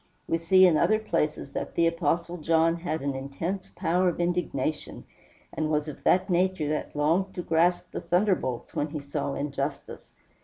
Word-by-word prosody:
We 165 - 0
see 185 +3 +6
in 170 -4 +5
other 215 +7 +3
places 155 -9 -2
that - - -5
the 170 - +3
Apostle 170 +1 0
John 165 +1 +2
had 160 -3 -3
an 140 -1 -1
intense 140 +8 -4
power 180 +2 +2
of 175 - -5
indignation, 170 -4 -2 0.5
and 155 -1 -1
was 150 0 0
of 150 - -8
that 185 - +4
nature 180 -4 +1
that 150 0 -3
longed 165 +6 +1
to 180 - -4
grasp 170 +2 +1
the - - -4
thunderbolts 175 - 0
when 145 - -1
he 155 0 -5
saw 140 0 -3
injustice. 140 0 -5
165 Hz, 175 wpm, -27 LUFS, 150-180 Hz, 0.5 s, see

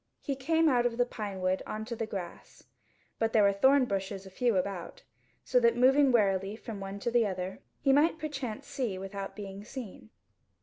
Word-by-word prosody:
He 275 - -3
came 320 +5 +2
out 245 -4 +4
of 230 -1 -5
the 245 - +3
pinewood 190 -5 -2
on 215 0 -4
to 235 +1 -5
the 225 -1 -3
grass; 190 -5 -8 0.6
but 225 0 0
there 215 - +5
were 200 0 +4
thornbushes 200 -5 +2
a 190 - -11
few 235 0 +1
about, 185 -2 -4 0.4
so - - +3
that 470 -1 +3
moving 270 +2 +5
warily 195 -3 +2
from 220 -2 -8
one 195 0 -6
to 235 - -1
the 235 -2 +3
other, 185 0 -4 0.2
he 275 -1 +4
might 315 +4 +4
perchance 275 -8 -5
see 260 -9 -3
without 195 +1 -6
being 200 -1 -7
seen. 215 - -9
220 Hz, 185 wpm, -30 LUFS, 195-265 Hz, 0.6 s, there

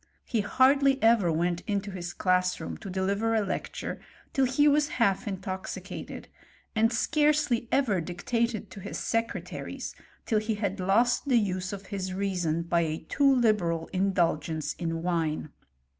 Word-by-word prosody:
He 230 -4 0
hardly 270 +5 +4
ever 225 -6 +5
went 170 +2 0
into 200 -1 -1
his 175 -2 -5
class 180 0 +1
room - - -5
to 195 - -8
deliver 200 +4 0
a 215 -2 +2
lecture - - -4 0.3
till 270 - +3
he 265 +4 +3
was 295 0 +4
half 200 -1 +2
in 195 -2 -3
toxicated, 190 -1 -6 0.5
and 225 +1 +3
scarcely 290 -1 +2
ever 225 -10 +2
dictated 220 +6 -2
to - - -9
his - - -6
secretaries 230 0 -3 0.3
till 220 - +2
he 215 +1 -2
had 200 -1 -2
lost 235 +9 +2
the 255 -3 +4
use 185 -3 -1
of 200 -1 -7
his 185 -1 -3
reason 180 -4 -1
by 170 0 +1
a 160 -1 -1
too 280 -1 +4
liberal 210 -10 +1
indulgence 165 -5 0
in 165 -1 -2
wine. 165 -3 -1
200 Hz, 155 wpm, -28 LUFS, 180-235 Hz, 0.5 s, ever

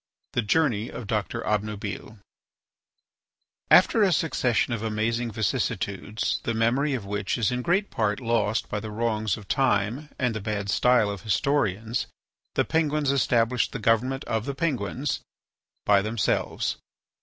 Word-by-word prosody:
III. - - -57
THE 105 - -10
JOURNEY 120 -6 +2
OF 120 - -7
DOCTOR 105 -3 -2
OBNUBILE 105 0 -3 1.5
After 200 +5 +6
a 195 -2 +4
succession 130 -7 +1
of 115 - -3
amazing 115 +2 -1
vicissitudes, 110 -3 -1
the 115 - -1
memory 130 +6 +2
of 115 -6 -5
which 105 +2 -2
is 115 -2 +1
in 125 0 -1
great 185 +9 +1
part 105 -3 0
lost 115 -3 0
by 105 - -3
the 110 - -6
wrongs 110 -2 -1
of 105 -3 -12
time 130 +2 +1
and 125 -3 0
the 110 - -4
bad 100 -1 -2
style 125 -4 +3
of 100 -2 -6
historians, 110 -2 0 0.5
the - - +2
Penguins 150 -3 +1
established 125 -3 +2
the - - -2
government 120 +4 +1
of 110 0 -2
the 140 - -3
Penguins 135 -2 -1 0.7
by 100 -1 +5
themselves. 110 +1 -1
115 Hz, 145 wpm, -26 LUFS, 105-130 Hz, 1.5 s, After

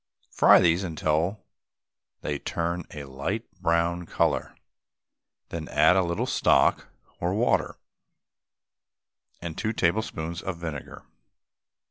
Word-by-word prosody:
Fry - - +7
these 85 +2 +3
till 80 +7 0 0.8
they 75 -1 -3
turn 85 +2 -3
a 75 - -8
light 70 - -4 0.2
brown 85 0 +1
colour, - - 0 0.9
then 80 -2 -5
add 90 - +4
a 95 - +4
little 85 -1 -1
stock - - +3 0.3
or - - -1
water, - - +1 1.7
and 85 -2 -5
two 110 0 -1
tablespoonfuls 85 -4 -1
of 95 -3 -4
vinegar. 80 -4 -7
85 Hz, 105 wpm, -26 LUFS, 80-90 Hz, 1.7 s, Fry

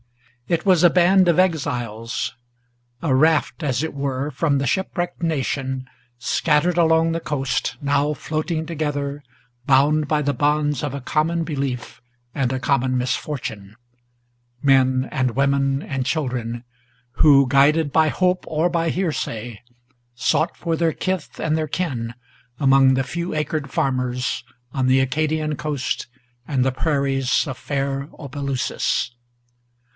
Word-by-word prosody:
It 170 +2 0
was 180 -3 +4
a 175 - +8
band 180 +1 +4
of 170 - +3
exiles: 120 - -1 0.7
a 150 -5 +2
raft, 155 +4 +2
as 130 -1 0
it 160 - -3
were, 140 0 -2
from 150 -3 +1
the 135 - -1
shipwrecked 175 +2 -2
Nation, 135 -4 -2 0.3
scattered 150 +7 +1
along 165 -1 +4
the 165 - -1
coast, 135 -5 -2
now 145 +1 +1
floating 155 +2 -2
together, 145 -3 -3 0.4
Bound 145 +2 +4
by 150 0 +1
the 145 0 +1
bonds 145 +1 +1
of 145 -2 -2
a - - -3
common 160 +5 0
belief 140 -5 -4 0.3
and 130 -3 0
a 130 - -1
common 130 -1 +1
misfortune; 125 -5 -3 0.9
Men 130 -1 +3
and 130 -3 -1
women 135 0 +2
and 135 -3 -3
children, 125 -6 -2 0.6
who, 140 -3 +7
guided 145 +2 +3
by 160 -1 +4
hope 180 +3 +1
or 160 +2 +1
by 165 -1 0
hearsay, 120 - -3 0.5
Sought 155 +7 +1
for 165 -1 -1
their 165 -1 +1
kith 185 -3 -3
and 155 -1 0
their 155 -1 -1
kin 125 -10 -3 0.4
among 135 -1 +5
the 135 - +1
few 170 +6 -4
acred 155 -2 -2
farmers 125 -2 -1 0.3
On 130 -1 0
the 130 +1 +4
Acadian 155 +3 0
coast, 145 -3 -3 0.4
and 130 -2 0
the 130 - +2
prairies 135 -1 +1
of 130 -3 -5
fair 140 +1 -3
Opelousas. 140 -3 -2
145 Hz, 135 wpm, -22 LUFS, 130-160 Hz, 0.9 s, a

